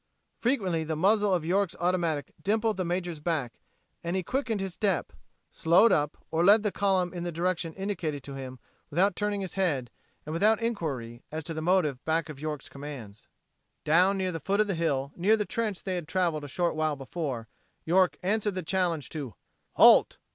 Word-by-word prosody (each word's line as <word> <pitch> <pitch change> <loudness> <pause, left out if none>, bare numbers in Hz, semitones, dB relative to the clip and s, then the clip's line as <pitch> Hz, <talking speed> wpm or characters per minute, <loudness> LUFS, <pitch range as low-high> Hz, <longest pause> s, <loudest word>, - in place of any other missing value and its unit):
Frequently 195 -10 0
the 160 0 -3
muzzle 205 +5 +3
of 175 -4 +1
York's 190 +2 +1
automatic 170 -5 0
dimpled 220 +1 +1
the 185 - 0
major's 175 -2 -2
back 150 -6 -2 0.4
and 170 +2 -2
he 190 - 0
quickened 245 -1 -1
his 190 -2 -3
step, 190 - 0 0.4
slowed 175 +8 +4
up, 150 0 +1
or 165 +1 +1
led 205 +3 +6
the 210 - 0
column 190 -3 +1
in 175 -1 -4
the 175 - -3
direction 170 0 -1
indicated 175 -8 -3
to 140 - -8
him 130 -1 -7 0.3
without 180 +5 +2
turning 205 -1 -1
his 190 -3 -5
head 150 -11 0 0.3
and 155 - -5
without 215 +6 +3
inquiry 145 - -3
as 155 0 -4
to 165 +2 -5
the 155 - -4
motive 160 -6 +1
back 160 0 0
of 145 -3 -8
York's 150 -2 -4
commands. 135 -8 -9 0.6
Down 180 +5 +4
near 185 -1 -1
the 165 - -4
foot 195 +7 -1
of 215 - +5
the 200 - -1
hill, 140 -5 -1
near 205 +6 +3
the 210 - -1
trench 215 -4 -2
they 190 - -2
had 175 -4 -3
traveled 170 -4 0
a - - -6
short 170 +5 0
while 155 -1 0
before, 135 -4 -4 0.4
York 185 +2 +3
answered 210 +1 0
the 185 - -3
challenge 170 -5 0
to 145 -7 -6 0.4
"Halt!" - - +6
175 Hz, 190 wpm, -28 LUFS, 155-195 Hz, 0.6 s, led